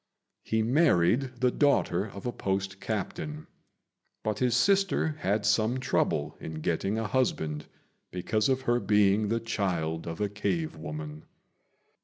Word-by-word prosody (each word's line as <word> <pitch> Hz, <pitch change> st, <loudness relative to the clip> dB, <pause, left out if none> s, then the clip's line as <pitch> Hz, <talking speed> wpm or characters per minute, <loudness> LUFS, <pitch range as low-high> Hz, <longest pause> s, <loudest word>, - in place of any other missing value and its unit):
He 110 Hz, 0 st, 0 dB
married 125 Hz, -, +2 dB
the 125 Hz, -1 st, +4 dB
daughter 140 Hz, -, +2 dB
of 100 Hz, -2 st, -9 dB
a 120 Hz, -, 0 dB
post 95 Hz, -2 st, -2 dB
captain; 150 Hz, -, -4 dB, 0.8 s
but 110 Hz, -1 st, -1 dB
his 125 Hz, -2 st, +2 dB
sister 195 Hz, +3 st, +3 dB
had 105 Hz, -3 st, 0 dB
some 110 Hz, +4 st, +2 dB
trouble 75 Hz, -, 0 dB
in 80 Hz, -, -6 dB
getting 85 Hz, +6 st, -1 dB
a 115 Hz, -, -1 dB
husband, 80 Hz, -, -1 dB, 0.4 s
because 105 Hz, +6 st, 0 dB
of 130 Hz, 0 st, +1 dB
her 120 Hz, -2 st, +2 dB
being 105 Hz, 0 st, +3 dB
the 115 Hz, +2 st, 0 dB
child 90 Hz, -8 st, -2 dB
of 80 Hz, 0 st, -5 dB
a 105 Hz, -, +1 dB
cave 160 Hz, -, -2 dB
woman. 75 Hz, 0 st, -7 dB
110 Hz, 140 wpm, -28 LUFS, 95-125 Hz, 0.8 s, the